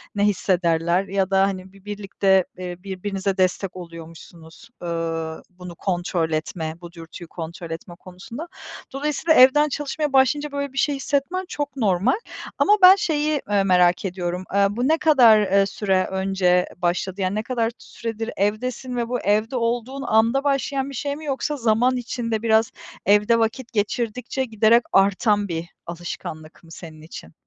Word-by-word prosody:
ne 205 - +1
hissederler 175 -3 +1
ya 195 -1 0
da, 190 0 +3
hani, 190 0 -6
bi 195 0 -19
birlikte, 195 -2 +1
eee, 180 -1 -5
birbirinize 195 0 -3
destek 185 0 0
oluyormuşsunuz, 165 +2 -12
ııı, 165 -1 -3
bunu 180 -1 -11
kontrol 175 -3 -1
etme, 160 +1 -3
bu 175 0 -10
dürtüyü 165 0 -11
kontrol 170 0 -8
etme 170 +1 -7
konusunda. 215 - -9 0.5
Dolayısıyla, 300 +3 +1
evden 295 +3 +6
çalışmaya 295 +1 -3
başlayınca 280 +3 +3
böyle 280 -1 -4
bir - - -11
şey 290 -1 +2
hissetmen 285 +7 -1
çok 290 -2 -4
normal. 195 - +2 0.4
Ama 420 - +5
ben 370 +1 +10
şeyi, 305 -7 0
eee, 200 -1 +2
merak 180 -1 +3
ediyorum; 180 0 -3
aaa, 200 +1 +2
bu 245 +3 0
ne 320 +1 +3
kadar, 250 -9 +6
eee, 195 0 +3
süre 190 -1 0
önce 190 -2 +1
başladı 185 +2 -2
yani 185 +2 0
ne 215 - -1
kadar 235 -2 -1
süredir 225 0 -6
evdesin 245 +5 -2
ve 235 -1 -1
bu 245 - -1
evde 215 +5 0
olduğun 245 +3 -2
anda 230 +5 +2
başlayan 275 -1 0
bir 275 - -8
şey 285 +2 -3
mi, 310 +1 -10
yoksa 290 +1 -2
zaman 245 +2 +2
içinde 230 -2 -3
biraz 220 -1 +2 0.3
evde 210 +3 +4
vakit 230 +2 -2
geçirdikçe 240 +4 -2
giderek 225 +1 +3
artan 200 +2 +3
bir 165 -1 -4 0.2
alışkanlık 165 -2 -8
mı 165 - -17
senin 160 -2 -11
için? 85 - -11
205 Hz, 155 wpm, -22 LUFS, 180-250 Hz, 0.5 s, ben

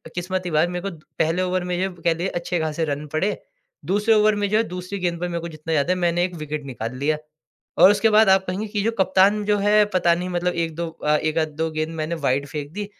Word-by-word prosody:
किस्मत 185 +1 -2
की 175 - -4
बात 155 +3 +2
मेरे 180 +2 -3
को 170 - -10 0.2
पहले 165 +3 +1
ओवर 185 0 0
में 180 0 -2
जो 190 - 0
कह 170 - +2
लीजिए 175 +3 -3
अच्छे 175 -1 -2
खासे 160 +1 -1
रन 145 0 -3
पड़े। 190 +7 0 0.5
दूसरे 210 +4 +2
ओवर 215 0 +4
में 205 0 0
जो 215 - +2
है 225 - +3
दूसरी 180 +1 -6
गेंद 175 -2 -1
पर 180 - -2
मेरे 170 -1 -3
को 170 - -5
जितना 155 +1 -5
याद 145 +3 +1
है 185 - +3
मैंने 175 -1 +1
एक 180 -1 -2
विकेट 155 -1 -5
निकाल 120 -2 -5
लिया। 150 +3 0 0.6
और 195 - +8
उसके 210 +2 +3
बाद 215 -1 +5
आप 190 0 +4
कहेंगे 195 +4 -3
कि 205 -1 -2
जो 225 - +1
कप्तान 195 +3 +3
जो 205 0 +2
है 210 +1 +4
पता 175 -2 +3
नहीं 180 +1 -4
मतलब 175 0 -1
1-2 170 0 -2 0.4
एक 155 +1 -1
आध 155 -1 +2
दो 160 +1 -1
गेंद 155 0 -2
मैंने 160 +2 -2
वाइड 140 +1 +1
फेंक 145 -1 -6
दी 205 0 -4
175 Hz, 255 wpm, -22 LUFS, 160-195 Hz, 0.6 s, और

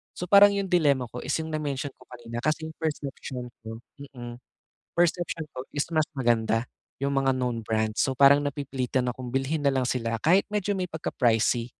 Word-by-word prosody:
So, 180 - -5
parang 200 +1 +8
'yong 200 -1 -1
dilema 145 -8 +3
ko 125 - -7
is - - -3
'yong 160 - -4
na-mention 145 -2 -3
ko 125 - -18
kanina 120 -1 -7
kasi 155 +1 0
'yong 160 - -10
perception 140 -5 -4 0.2
ko 115 0 -7 0.3
mm, 120 -2 -8 0.6
perception 175 -1 +1
ko 130 +1 -7
is 145 - +1
mas 155 -1 +2
maganda 115 -2 +1 0.4
'yong 140 - +1
mga 135 -1 +2
known 125 -2 -1
brands. 110 -1 -1
So, 135 -2 0
parang 140 +2 +7
napipilitan 130 -3 -2
akong 125 0 -7
bilhin 140 +3 0
na 140 - +4
lang 130 - +1
sila 115 -2 -1
kahit 185 +5 +4
medyo 205 -1 0
may 180 - -1
pagka 160 -1 -4
pricey. 115 -1 +2
135 Hz, 190 wpm, -26 LUFS, 120-155 Hz, 0.6 s, parang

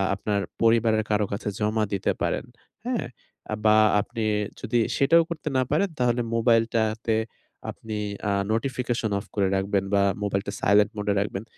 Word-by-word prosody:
আপনার 100 0 -1 0.2
পরিবারের 115 -1 +3
কারো 105 0 +2
কাছে 100 +1 -4
জমা 110 +1 +1
দিতে 95 - 0
পারেন। - - -1 0.4
হ্যাঁ? 250 -2 -1 0.6
বা 110 0 +6 0.2
আপনি 115 +1 -5 0.4
যদি 120 - 0 0.2
সেটাও 165 +4 +5
করতে 155 -2 -6
না 130 - +3
পারেন 190 +7 +2
তাহলে 120 -1 +2
মোবাইলটাতে 115 -1 +2 0.6
আপনি 110 -1 -7 0.3
আ - - +2 0.2
notification 120 -2 -1
off 100 - -6
করে 100 -2 +2
রাখবেন 95 0 0
বা 100 - +4 0.2
মোবাইলটা 100 0 -1
silent 105 +2 +4
mode 105 0 -2
এ - - +2
রাখবেন। 100 0 -3
110 Hz, 150 wpm, -25 LUFS, 105-120 Hz, 0.6 s, বা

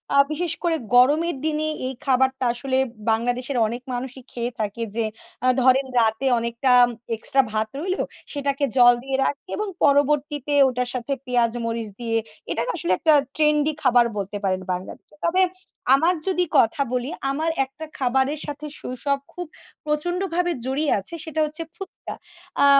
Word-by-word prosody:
আ - - +5
বিশেষ 330 +1 -1
করে 340 -2 +2 0.2
গরমের 295 +7 +4
দিনে 310 0 0 0.2
এই 265 - -3
খাবারটা 265 0 +2
আসলে 260 +2 -2 0.3
বাংলাদেশের 245 +4 -1
অনেক 240 +3 -5
মানুষই 260 +1 -5
খেয়ে 240 0 -3
থাকে 215 +2 -3
যে, 230 -1 0 0.4
আ - - +4
ধরেন 260 +2 +4
রাতে 220 +3 +1
অনেকটা 235 +2 0 0.4
এক্সট্রা 270 +4 +2
ভাত 215 0 0
রইলো; 370 +4 -1 0.3
সেটাকে 280 0 -2
জল 245 0 +8
দিয়ে 270 0 -1
রাখে 285 +8 -3
এবং 425 - -2 0.2
পরবর্তীতে 290 0 +2
ওটার 250 -1 -1
সাথে 250 +2 -2
পেঁয়াজ, 240 -2 +2
মরিচ 230 -1 -3
দিয়ে 230 -1 -1 0.3
এটাকে 165 - 0
আসলে 175 - -1
একটা 315 - +5 0.2
ট্রেন্ডি 300 0 +3
খাবার 245 -2 +5
বলতে 200 +1 -3
পারেন 185 -1 0
বাংলাদেশে। 185 +10 -8
তবে 365 +3 +3 0.5
আমার 325 +6 +4
যদি 360 -1 +2
কথা 235 +3 +3
বলি, 250 +2 -1 0.2
আমার 315 +4 -1 0.2
একটা 310 +4 -10
খাবারের 265 +3 +1
সাথে 295 +1 -6
শৈশব 275 +3 -2
খুব 355 - -5 0.4
প্রচন্ডভাবে 350 +3 0
জড়িয়ে 280 +3 0
আছে 195 - -6
সেটা 315 -1 -4
হচ্ছে 310 +2 -5
ফুচকা। 390 -1 -8 0.5
আ - - +7
270 Hz, 155 wpm, -23 LUFS, 245-305 Hz, 0.5 s, জল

